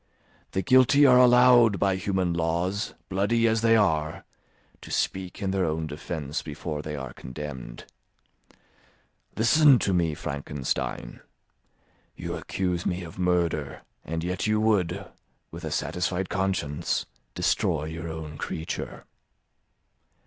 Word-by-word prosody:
The 95 - 0
guilty 130 +2 +5
are 125 -2 +7
allowed, 125 -3 +6
by 95 +1 +2
human 95 -2 -1
laws, 85 +5 -1
bloody 110 +5 +1
as 110 0 +1
they 115 0 +5
are, 80 -7 +1 0.6
to - - -11
speak 95 +1 -2
in 95 - 0
their 95 -1 0
own 80 0 -1
defence 75 -1 -4
before 75 0 -5
they 75 0 -5
are 65 -2 -6
condemned. 65 -3 -8 1.5
Listen 135 +5 +6
to 100 - 0
me, 85 -4 +1
Frankenstein. 70 -3 -4 1.0
You - - -5
accuse 90 -2 -2
me 90 0 -2
of 85 +2 -10
murder, 85 -6 0 0.2
and 80 0 -4
yet 90 +4 -2
you 110 0 +2
would, 100 -3 +1 0.5
with - - -9
a - - -3
satisfied 90 +1 -2
conscience, 95 -7 -1 0.3
destroy 75 - +1
your 80 +1 -6
own 80 -2 -7
creature. 80 - -5
90 Hz, 125 wpm, -26 LUFS, 80-100 Hz, 1.5 s, are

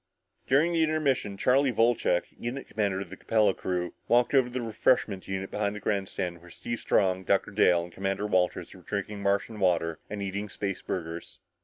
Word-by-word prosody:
During 155 +6 +3
the 165 - +2
intermission 145 -10 +1
Charlie 130 +4 +3
Wolcheck, 115 -6 +2
unit 125 +3 -5
commander 100 -3 -1
of - - -8
the - - -6
Capella 110 -3 +2
crew, 90 -1 -3
walked 120 +2 +3
over 130 -3 +5
to 125 - -11
the - - 0
refreshment 110 -3 +1
unit 95 0 -4
behind 105 0 -1
the - - -5
grandstand 95 -4 -2
where 85 - -14
Steve 115 +6 -5
Strong, 95 -1 +1
Dr. 100 +1 +1
Dale 90 -4 +4
and 85 0 -10
Commander 95 +1 -2
Walters 95 -3 0
were 95 - -14
drinking 100 +2 -4
Martian 100 +2 0
water 85 -4 +1
and 105 - -5
eating 100 +2 -3
spaceburgers. 90 -4 -4
100 Hz, 180 wpm, -28 LUFS, 95-115 Hz, -, over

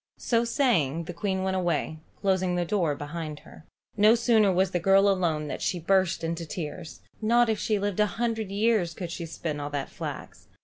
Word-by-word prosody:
So 230 -1 +1
saying 170 - +1
the 175 - -7
Queen 190 +2 -2
went 190 0 0
away, 175 -3 -1 0.2
closing 185 -2 +1
the 175 0 0
door 170 -6 0
behind 150 +1 -6
her. - - -15 0.3
No 215 +2 +6
sooner 225 -4 +3
was 185 +1 +1
the 175 - 0
girl 195 +3 +4
alone 170 -6 +1
than - - -4
she 180 - -1
burst 185 0 +1
into 165 +1 -2
tears. 160 0 -7 0.2
Not 235 +2 +3
if 220 -2 0
she 215 - 0
lived 205 0 -2
a 210 - +4
hundred 225 -3 -1
years 200 -4 +1
could 175 -3 -5
she 170 -1 -5
spin 155 -2 -4
all 145 0 -4
that 145 -2 -4
flax. - - -7
185 Hz, 200 wpm, -27 LUFS, 165-210 Hz, 0.3 s, No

